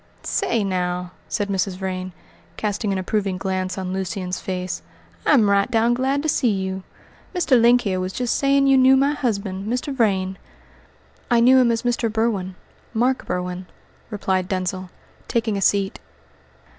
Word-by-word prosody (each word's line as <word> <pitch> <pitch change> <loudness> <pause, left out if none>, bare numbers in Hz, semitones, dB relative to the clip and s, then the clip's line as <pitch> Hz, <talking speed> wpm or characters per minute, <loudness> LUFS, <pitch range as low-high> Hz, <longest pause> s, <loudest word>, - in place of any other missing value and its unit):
"Say, 230 -3 0
now," 180 -2 -2 0.2
said 205 -2 -1
Mrs. 190 -1 -1
Vrain, 185 -1 -4 0.5
casting 210 0 -1
an 195 - 0
approving 195 0 -1
glance 185 0 -2
on 185 -1 -3
Lucian's 185 -1 -3
face, 185 -1 -4 0.5
"I'm 245 -9 +5
right 200 0 +3
down 230 +1 +3
glad 265 +3 0
to - - -1
see 275 -5 +2
you. 190 -2 -2 0.5
Mr. 285 -9 +3
Link 240 +1 +5
here 190 -5 -1
was 185 0 -2
just 245 +3 -1
saying 275 0 +3
you 270 -1 +5
knew 260 +1 +6
my 275 +2 +3
husband, 200 -6 -2
Mr. 250 +3 -2
Vrain." 190 -5 +1 0.9
"I 240 -2 +4
knew 255 +3 +6
him 245 -2 +4
as 230 +1 -1
Mr. 240 -2 0
Berwin 210 -5 -1 0.4
Mark 250 +3 +1
Berwin," 180 0 -3 0.4
replied 190 -4 -1
Denzil, 185 -1 -2 0.4
taking 225 -3 0
a 195 - -2
seat. 195 0 +1
200 Hz, 155 wpm, -22 LUFS, 185-240 Hz, 0.9 s, knew